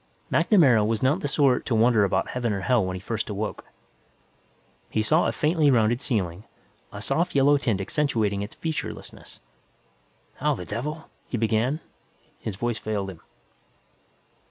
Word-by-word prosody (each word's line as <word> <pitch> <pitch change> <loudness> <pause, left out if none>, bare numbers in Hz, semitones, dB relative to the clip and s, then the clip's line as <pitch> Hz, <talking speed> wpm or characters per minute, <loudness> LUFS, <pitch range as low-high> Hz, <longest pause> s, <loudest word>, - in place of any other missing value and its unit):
MacNamara 135 - +5
was 110 +1 -1
not 140 +7 +3
the 145 - -2
sort 135 -3 +2
to 120 - +1
wonder 110 -1 +4
about 95 -1 0
heaven 120 -3 -1
or 100 - -3
hell 120 +1 +2
when 95 0 -3
he - - -5
first 110 +3 -4
awoke. 105 +1 -4 1.2
He 110 - 0
saw 155 +9 +3
a - - +1
faintly 155 -1 +2
rounded 120 -1 +3
ceiling, 95 -8 -2 0.5
a - - -7
soft 170 +1 0
yellow 140 +1 +5
tint 115 -8 0
accentuating 110 -4 0
its 105 +2 -6
featurelessness. 160 -2 -6 1.0
"How - - +1
the 90 - -7
devil 150 - -5
", - - -39
he 125 - -3
began. 115 +7 0 0.6
His 110 - -5
voice 120 +1 -2
failed 100 -2 -3
him. 85 -3 -14
115 Hz, 155 wpm, -25 LUFS, 105-140 Hz, 1.2 s, MacNamara